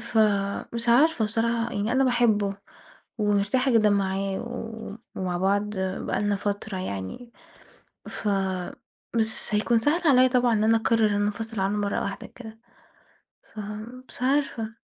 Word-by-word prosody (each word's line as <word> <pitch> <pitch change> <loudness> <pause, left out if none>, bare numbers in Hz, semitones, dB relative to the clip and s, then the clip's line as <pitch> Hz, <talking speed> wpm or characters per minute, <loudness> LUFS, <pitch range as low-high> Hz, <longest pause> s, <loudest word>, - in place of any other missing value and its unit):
فمش 215 +2 0
عارفة 255 0 +4
بصراحة 230 +2 0
يعني، 210 +3 -1
أنا 265 +1 +3
باحبه، 220 -5 +2 0.6
ومرتاحة 210 +6 +2
جدًا 215 -2 +4
معاه، 195 -1 0
و 225 -3 -7 0.2
ومع 180 -1 -1
بعض 200 +2 +1
بقالنا 195 +2 -1
فترة 205 0 -3
يعني، 185 - -6 0.8
ف 210 - -3 0.9
مش 220 -1 +1
هيكون 220 +2 +2
سهل 300 +8 +1
عليّا 255 -1 +6
طبعًا 245 -2 +2
إن 215 0 +2
أنا 225 +1 +4
أقرر 225 0 +2
إن 205 - 0
أنا 205 - +1
أنفصل 220 +1 -3
عنه 200 +2 0
مرة 205 -1 -1
واحدة 200 - -5
كده، 225 -2 -12 1.0
فمش 215 +5 -8
عارفة. 255 -5 0
220 Hz, 135 wpm, -26 LUFS, 205-235 Hz, 1.0 s, عليّا